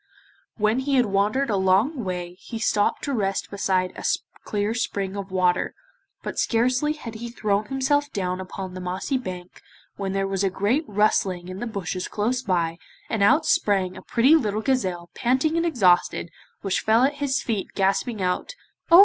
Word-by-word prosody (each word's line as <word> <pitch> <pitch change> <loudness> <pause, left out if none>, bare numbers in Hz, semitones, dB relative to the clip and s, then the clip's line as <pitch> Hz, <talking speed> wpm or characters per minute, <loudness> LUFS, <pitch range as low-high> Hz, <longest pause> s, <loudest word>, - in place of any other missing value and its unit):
When 215 +3 +2
he 275 +1 0
had 250 -2 +4
wandered 210 +6 +1
a - - +2
long 195 +9 +2
way 180 -2 -4
he 225 +5 -8
stopped 215 -2 +1
to 280 - -1
rest 195 -5 -1
beside 185 -2 0
a - - -8 0.4
clear 210 +1 -1
spring 200 -4 -2
of 200 -1 -5
water, 185 -1 +1 0.5
but - - -4
scarcely 255 +6 +2
had 245 -7 -8
he 235 +2 -6
thrown 210 -3 0
himself 285 +3 0
down 185 -1 -2
upon 190 0 -6
the 185 - -6
mossy 185 +9 -2
bank 185 -6 -8 0.4
when 195 -1 -3
there 195 0 0
was 195 0 -1
a 195 - +3
great 215 - 0
rustling 195 -3 +1
in 185 +1 -6
the 240 - -3
bushes 190 -3 -3
close 235 +4 -1
by, 170 -5 0 0.3
and 220 - 0
out 275 +11 +5
sprang 195 - +2
a - - -9
pretty 250 +5 +3
little 215 -8 +1
gazelle 185 -9 -1
panting 260 - +1
and 335 +1 +2
exhausted, 185 - +2 0.3
which 195 -2 0
fell 225 +3 +4
at 285 +2 +2
his 270 -2 0
feet 215 -5 -2
gasping 195 +2 0
out 180 - -1 0.3
'Oh! 340 +1 +9
205 Hz, 180 wpm, -24 LUFS, 185-250 Hz, 0.5 s, Oh